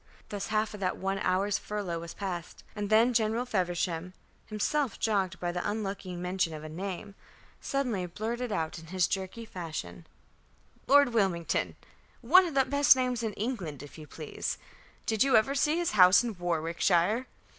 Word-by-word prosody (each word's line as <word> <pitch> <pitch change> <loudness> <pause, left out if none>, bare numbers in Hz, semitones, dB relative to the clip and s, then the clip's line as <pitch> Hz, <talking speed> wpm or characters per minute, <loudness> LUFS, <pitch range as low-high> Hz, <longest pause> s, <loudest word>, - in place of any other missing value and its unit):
Thus 205 -1 -4
half 215 0 0
of 210 - -8
that 185 -2 -1
one 195 +1 -2
hour's 195 +2 +1
furlough 200 -5 -4
was 170 0 -8
passed; 180 -4 -5
and 205 -1 -3
then 225 +3 +5
General 225 +1 +1
Feversham, 180 -4 -2 0.3
himself 230 +4 -1
jogged 195 -4 0
by 175 -1 -1
the 180 +2 -2
unlucky 200 -3 -4
mention 180 -2 -1
of 155 - -8
a 155 - -7
name, 190 +4 -5 0.5
suddenly 240 -10 -1
blurted 230 +6 -4
out 165 -4 -2
in 165 - -13
his 180 0 +1
jerky 195 +4 -4
fashion: 155 - -7 0.8
"Lord 285 -1 +6
Wilmington. 190 -7 0 0.5
One 355 +10 +6
of 315 - -6
the 270 -1 +4
best 285 0 +5
names 250 -2 -1
in 220 -2 -2
England, 190 - -4
if 145 +2 -12
you 155 - -10
please. 155 0 -4 0.5
Did 220 -2 0
you 270 -2 +5
ever 220 +6 +4
see 295 +3 +2
his 345 -1 0
house 185 +1 +7
in 235 -3 -3
Warwickshire? 175 +6 +1
200 Hz, 165 wpm, -29 LUFS, 175-230 Hz, 0.8 s, house